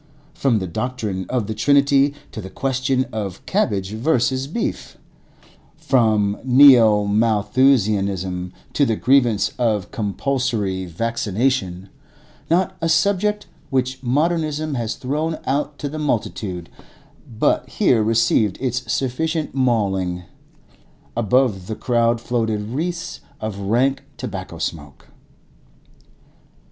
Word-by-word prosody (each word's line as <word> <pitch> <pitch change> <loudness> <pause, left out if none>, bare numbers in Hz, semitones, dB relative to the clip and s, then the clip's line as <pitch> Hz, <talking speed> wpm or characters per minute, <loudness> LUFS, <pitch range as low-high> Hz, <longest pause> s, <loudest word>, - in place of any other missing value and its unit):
From 130 -5 +1
the 95 - -2
doctrine 105 -1 -3
of 125 -4 0
the 110 - -3
Trinity 140 +4 +3 0.2
to 110 - -6
the 95 - -8
question 130 +2 0
of 100 -4 -5
cabbage 105 - 0
versus 130 +2 0
beef; 200 +11 -4 0.8
from 110 -9 +2
Neo 125 -6 +7
Malthusianism 100 -4 +1 0.2
to 145 - +2
the 115 -5 +2
grievance 120 -5 +3
of 105 -5 0
compulsory 110 -4 -1
vaccination; 105 -1 -1 0.6
not 180 +2 +1
a 165 - 0
subject 205 +3 +1 0.2
which 130 -1 -1
modernism 155 +3 0
has 115 -3 -2
thrown 155 +5 -2
out 145 +2 -1
to 145 - -4
the 155 +2 -5
multitude 105 - -3 0.7
but - - +1
here 115 -3 +2
received 110 -2 +2
its 125 -1 -2
sufficient 155 +5 -1
mauling. 95 -9 0 0.9
Above 115 -4 +1
the 110 - -3
crowd 115 -1 +1
floated 110 -3 -2
wreaths 170 +6 -3 0.2
of 110 -2 -5
rank 120 +7 +1 0.2
tobacco - - -6
smoke. 70 -4 -6
120 Hz, 110 wpm, -21 LUFS, 105-135 Hz, 0.9 s, Neo